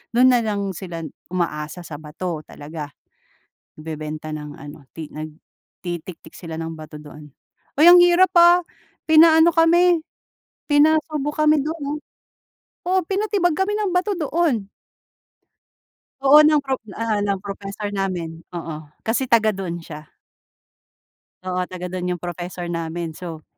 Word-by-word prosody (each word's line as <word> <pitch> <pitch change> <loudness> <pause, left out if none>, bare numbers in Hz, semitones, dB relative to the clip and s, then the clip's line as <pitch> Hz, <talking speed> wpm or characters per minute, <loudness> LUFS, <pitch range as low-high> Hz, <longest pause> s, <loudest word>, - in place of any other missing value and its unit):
do'n 255 +1 +6
na 245 - +4
lang 200 -2 -2
sila 170 -2 -7 0.2
umaasa 170 -1 -3
sa 150 -3 -8
bato 160 +2 -5
talaga. 150 0 -8 0.9
Nagbebenta 155 0 -6
ng 150 -1 -7
ano 145 -1 -12
ti 155 -2 -8
nagtitiktik 160 +2 -9
sila 165 -2 -7
ng 165 0 -5
bato 155 -1 -10
doon. 150 0 -12 0.5
Uy 300 - +5
ang 355 0 +9
hirap, 350 +1 +5
ah, 345 +1 +7 0.4
pinaano 320 +1 +6
kami 340 +1 +4 0.7
pinasubok 300 0 +2
kami 300 -2 +4
do'n, 315 +1 -4
ah. - - -5 0.9
Oo 375 +1 +3
pinatibag 395 -3 0
kami 385 +5 0
ng 405 -4 -1
bato 370 +3 +1
doon. 300 - 0 1.6
Oo, 290 +3 +8
ng 305 0 +5
pro 265 -1 -2 0.2
ah, 225 -2 -1
ng 200 -1 0
professor 200 +1 -6
namin. 175 -5 -3 0.2
Oo 155 -2 -7 0.2
kasi 245 +4 0
taga-doon 205 -7 +1
siya. 155 -1 -10 1.4
Oo 185 0 -2
taga 180 0 -6
dun 180 -1 -3
yung 180 -1 -3
professor 175 0 -6
namin. 165 0 -4
So, 160 -2 -8
195 Hz, 130 wpm, -21 LUFS, -, 1.6 s, ang